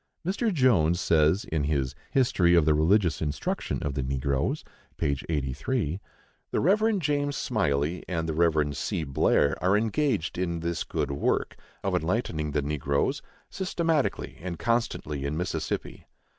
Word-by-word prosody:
Mr. 205 +5 0
Jones 105 - +3
says, 80 +2 +3
in 75 -3 -1
his 70 -4 0 0.2
"History 90 -10 +3
of 85 -3 +5
the 75 - +4
Religious 85 +4 +2
Instruction 75 -2 -2
of 70 - -2
the 70 - -2
Negroes" 65 +1 -1 0.3
(p. 70 -1 +1
83): 75 - -1 0.5
"The - - 0
Rev. 215 +5 +3
James 145 -4 0
Smylie 75 - 0
and 80 -3 -2
the 80 - -1
Rev. 75 -3 +2
C. 80 - -2
Blair 70 0 +2
are 95 +3 +4
engaged 110 - 0
in 85 -2 -1
this 85 0 -2
good 70 - -2
work 70 - 0 0.3
(of - - 0
enlightening 80 -3 -1
the 75 0 -1
negroes) 70 -1 0 0.3
systematically 165 -6 -1
and 85 -1 -4
constantly 110 - -1
in 70 +2 -2
Mississippi." 90 +2 -3
80 Hz, 145 wpm, -27 LUFS, 75-115 Hz, 0.5 s, of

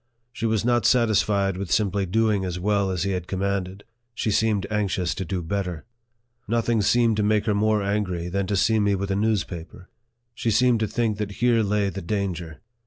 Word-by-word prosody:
She 115 -1 -2
was 110 -1 0
not 120 -3 +3
satisfied 105 -5 +2
with 95 -2 -5
simply 100 -2 +1
doing 105 0 +1
as 90 -1 -3
well 100 +1 +1
as 90 -3 -1
he 100 - -1
had 90 -2 -3
commanded; 95 0 -2 0.3
she 110 - -1
seemed 105 -2 +1
anxious 95 -4 0
to 95 - -4
do 90 0 -3
better. 90 -2 -3 0.6
Nothing 115 0 +1
seemed 115 0 +3
to - - +2
make 105 0 +2
her 110 - +1
more 105 0 +1
angry 100 -4 -1
than 95 +1 -2
to 100 - 0
see 110 +3 +3
me 100 -1 +2
with 100 +1 -3
a - - +1
news 105 -1 +1
paper. 90 +1 -10 0.4
She 115 - -2
seemed 120 +2 +3
to 110 - 0
think 110 -1 -1
that 105 -1 -3
here 120 +1 +2
lay 105 -1 +1
the 100 - -6
danger. 85 -5 -3
100 Hz, 200 wpm, -24 LUFS, 95-110 Hz, 0.6 s, not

